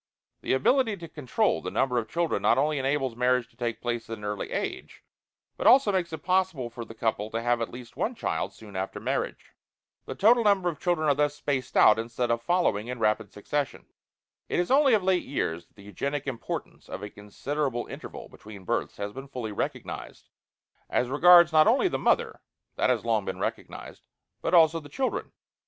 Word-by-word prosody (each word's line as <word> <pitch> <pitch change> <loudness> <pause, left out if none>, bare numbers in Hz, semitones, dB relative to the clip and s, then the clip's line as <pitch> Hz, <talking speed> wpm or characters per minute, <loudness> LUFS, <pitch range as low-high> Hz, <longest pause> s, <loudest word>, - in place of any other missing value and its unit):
The - - 0
ability 220 - +2
to 170 -2 -9
control 155 - 0
the - - -4
number 125 -2 +1
of 110 -2 -6
children 170 -1 -1
not 120 - +3
only 150 +1 +1
enables 135 -2 -1
marriage 125 0 +1
to - - -29
take 115 -2 -3
place 120 -2 -3
at 115 - -4
an 105 - -13
early 105 -1 -3
age, - - -5 0.5
but - - 0
also 260 -5 +6
makes 180 -3 -1
it 160 - -7
possible 180 -10 0
for 120 0 -7
the 115 0 -12
couple 110 -2 -1
to 115 - -3
have 120 0 +1
at 115 - -2
least 120 -1 -11
one - - -2
child - - -2
soon 105 -3 -14
after 95 +1 -3
marriage. - - -3 0.6
The - - -5
total 235 +3 +5
number 200 -4 +3
of 155 -4 -7
children 170 -3 0
are 145 - +5
thus 145 +1 0
spaced 140 -3 -2
out, 105 +1 +6
instead 120 +1 -2
of 115 0 0
following 120 - +1
in 125 0 -4
rapid 110 -2 0
succession. 140 +7 -3 0.6
It - - 0
is 175 - 0
only 275 -3 +5
of 205 - 0
late 185 -1 +2
years 85 - -3
that - - -38
the 100 - -15
eugenic 140 +9 -4
importance 130 -4 -6
of 100 - -6
a 105 - -5
considerable 125 +5 -3
interval - - -9
between 105 -2 -12
births - - -2
has 100 0 -5
been 135 +1 -8
fully 125 -5 -5
recognized, 105 - -5 0.6
as 125 - 0
regards 170 +4 +7
not 155 0 +6
only 255 +11 +4
the - - -2
mother - - +1 0.3
this - - +1
has - - 0
long - - +1
been - - -4
recognized - - -6 0.3
but - - +1
also 165 -1 +5
the 145 -2 -13
children. 260 - -2
135 Hz, 200 wpm, -27 LUFS, 115-170 Hz, 0.6 s, regards